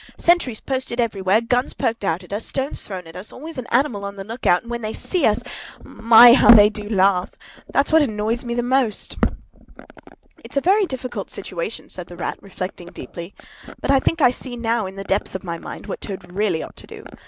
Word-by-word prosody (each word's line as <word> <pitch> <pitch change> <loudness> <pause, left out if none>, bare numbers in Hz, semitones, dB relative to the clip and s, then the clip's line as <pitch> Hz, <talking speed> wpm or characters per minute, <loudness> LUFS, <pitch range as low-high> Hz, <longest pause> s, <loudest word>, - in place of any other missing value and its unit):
Sentries 335 -10 +2
posted 260 -2 -3
everywhere, 205 -2 +2
guns 245 +3 0
poked 230 -2 -2
out 175 -1 -1
at 180 - -10
us, 210 - -2
stones 270 +1 -2
thrown 185 -3 -6
at 165 - -13
us; 190 +4 -6
always 310 +1 -8
an 245 - -7
animal 240 -5 +1
on 200 0 -5
the 195 - -6
look 225 +5 -5
out, 175 - +4
and 235 - -10
when 235 0 -3
they 215 0 -4
see 360 -6 0
us, 215 +2 +1 0.4
my! 230 +1 +7
how 255 - +5
they 210 -3 +9
do 210 -1 -6
laugh! 190 -3 +2 0.4
That's 280 - +1
what 320 0 +6
annoys 225 -2 -1
me 235 -1 -3
most!" 245 -2 0 1.3
"It's - - -7
a - - +6
very 390 +6 +3
difficult 250 - -5
situation," 190 +2 -6
said 180 -2 -5
the 175 - -11
Rat, - - -4
reflecting 185 -2 -7
deeply. 175 0 -9 0.4
"But - - 0
I 275 - +5
think 330 +4 0
I 250 - +6
see 250 0 -7
now, 230 -3 0
in 190 - -9
the 195 - -6
depths 195 0 -2
of 190 - -5
my 170 -2 -5
mind, - - -9
what - - -6
Toad 190 -3 -8
really 190 -5 0
ought - - -11
to - - -12
do. - - -11
220 Hz, 215 wpm, -21 LUFS, 195-250 Hz, 1.3 s, they